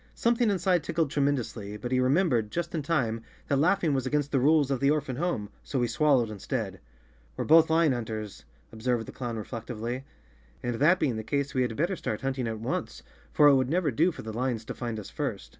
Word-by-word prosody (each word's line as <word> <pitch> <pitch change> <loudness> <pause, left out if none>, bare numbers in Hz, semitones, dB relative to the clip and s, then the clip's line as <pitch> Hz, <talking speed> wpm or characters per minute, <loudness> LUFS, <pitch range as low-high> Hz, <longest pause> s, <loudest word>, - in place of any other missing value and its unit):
Something 235 -1 +2
inside 185 -3 +2
tickled 165 -4 -1
tremendously, 125 -7 -1
but 120 +3 -6
he 130 - +3
remem¬ 140 +9 +3
bered, 115 -7 +1
just 170 +6 -3
in 160 - -1
time, 125 -7 0 0.3
that 140 - +1
laughing 170 -1 +2
was 130 -1 0
against 145 +1 0
the 135 - +2
rules 145 +1 +3
of 135 - 0
the 140 - +3
orphan 145 -4 0
home, 145 - -2
so 135 - -2
he 120 - +2
swallowed 125 -3 +2
instead. 100 -2 -4 0.6
"We're - - -2
both 160 +1 +6
lion 160 -2 +4
hunters," 110 -4 -4 0.3
observed 115 +1 -1
the - - -9
clown 120 -3 -5
re¬ 105 - -5
flectively, 120 +1 -5 0.6
"and 120 - -1
that 165 +7 +4
being 125 -7 0
the 110 - -4
case 140 +4 -1
we 130 - +1
had 120 -3 -1
better 175 +5 +1
start 110 -10 -4
hunting 135 -2 -2
at 110 -1 -4
once, 115 - -4 0.3
for 150 - +6
it 145 - +7
would 130 -1 +2
never 165 -2 +1
do 165 +9 +3
for - - -9
the 110 0 -6
lions 120 -1 -2
to - - -5
find 115 -3 -4
us 105 - -9
first. - - -4
130 Hz, 225 wpm, -28 LUFS, 115-155 Hz, 0.6 s, it